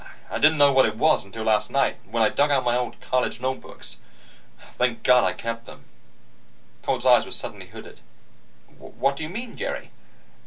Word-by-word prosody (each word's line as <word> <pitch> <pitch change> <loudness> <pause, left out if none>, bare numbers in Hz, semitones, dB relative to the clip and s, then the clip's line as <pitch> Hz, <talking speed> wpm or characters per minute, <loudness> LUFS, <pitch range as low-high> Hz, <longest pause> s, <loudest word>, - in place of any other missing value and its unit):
I - - -2
didn't 155 +1 +5
know 145 -1 +5
what 130 0 +5
it 110 0 -5
was 155 +5 +3
until 105 +3 -8
last 105 -1 +1
night, 140 0 +1
when 115 0 +1
I 110 - +4
dug 145 +1 +1
out 140 -2 +2
my 120 -1 +1
old 125 -1 -3
college 125 -2 -1
notebooks. 130 +1 -5 0.7
Thank 125 -2 -1
God 125 -3 +5
I 90 -1 +1
kept 115 +3 -6
them." - - -13 1.0
Coltz's - - -2
eyes - - +6
were - - -10
suddenly - - -5
hooded. - - -12 0.8
"What 140 0 -2
do 140 - -8
you 155 - -4
mean, 230 +6 -7
Jerry?" - - -5
125 Hz, 185 wpm, -24 LUFS, 115-140 Hz, 1.0 s, eyes